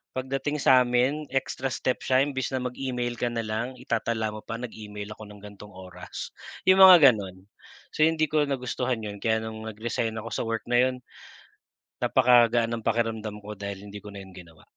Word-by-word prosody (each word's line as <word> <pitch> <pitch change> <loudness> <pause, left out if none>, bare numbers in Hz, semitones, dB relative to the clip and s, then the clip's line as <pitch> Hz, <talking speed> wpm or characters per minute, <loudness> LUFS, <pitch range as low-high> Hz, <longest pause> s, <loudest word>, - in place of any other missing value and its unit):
pagdating 135 +3 -2
sa'min, 130 +4 +3
extra 135 0 -2
steps 130 - -2
siya 130 +1 +5
imbes 135 -2 -2
na 130 - -1
mag-email 125 -1 -3
ka 120 - 0
nalang, 115 +2 -3
itatala 115 -3 -1
mo 110 - -6
pa, 115 - -5
nag-email 105 -3 -8
ako 110 - -11
ng 105 0 -13
gan'tong 105 0 -12
oras, 90 -1 -9 0.4
yung 190 +1 +6
mga 175 -8 +10
ganun. 95 -3 -8 0.5
So, 155 - +3
hindi 160 -1 +3
ko 150 0 +2
nagustuhan 125 -3 -2
yun, 105 -1 -6
kaya 110 -1 +2
nung 110 0 -7
nag-resign 110 +1 -3
ako 115 +1 -7
sa - - -2
work 115 0 -2
na 120 0 +3
yun, 130 - -7 1.1
napakagaan 120 -2 +4
ng 110 - -13
pakiramdam 110 -2 -1
ko, 105 +1 -7
dahil 100 -1 -6
hindi 105 - -8
ko 105 +1 -11
na 100 - -8
yun 95 - -13
ginawa. 85 -4 -14
115 Hz, 180 wpm, -26 LUFS, 105-130 Hz, 1.1 s, mga